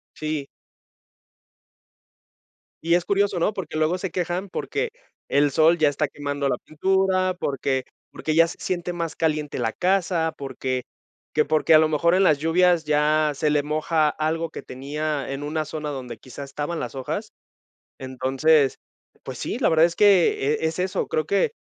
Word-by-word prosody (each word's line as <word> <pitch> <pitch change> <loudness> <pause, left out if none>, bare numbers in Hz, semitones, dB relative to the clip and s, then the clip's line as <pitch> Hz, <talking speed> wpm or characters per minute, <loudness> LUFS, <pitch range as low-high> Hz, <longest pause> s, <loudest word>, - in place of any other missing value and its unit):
Sí. 155 -2 -3 2.4
Y 170 +1 +2
es 175 0 +2
curioso, 200 -2 +1
¿no? 175 - +1
Porque 185 -7 -6
luego 155 +3 +1
se 190 0 -4
quejan 180 +2 -2
porque 460 - -3 0.4
el 145 +1 +3
sol 160 +5 +4
ya 155 -2 +4
está 145 +1 -1
quemando 145 -1 -3
la 130 - +1
pintura, 185 +3 +1
porque 135 -3 -1 0.3
porque 155 - -3
ya 165 +1 +5
se - - -9
siente 175 -1 -3
más 165 -2 -4
caliente 155 -2 -1
la 115 -2 0
casa, 180 - +1
porque 130 -2 -3 0.5
que 150 - +3
porque 155 +1 +3
a - - +9
lo 155 0 +4
mejor 170 +3 +2
en 190 +1 +4
las 150 -5 +4
lluvias 170 +1 +3
ya 150 0 +2
se 150 +2 0
le 150 -1 +2
moja 155 +1 +1
algo 160 +2 -1
que - - -8
tenía 145 +3 -4
en 135 +1 -4
una 155 +1 -2
zona 150 -1 -5
donde, 125 -4 -6
quizá, 130 +4 -10
estaban 145 +4 -4
las 120 - -5
hojas. 155 - -4 0.7
Entonces, 135 +2 +2 0.5
pues, - - -7
sí, - - -3
la - - +2
verdad 160 0 +5
es 170 - -6
que 195 -9 +4
e 160 - -1
es 160 +1 -3
eso, 185 +1 -1
creo 155 - 0
que 200 - +1
155 Hz, 170 wpm, -24 LUFS, 145-175 Hz, 2.4 s, a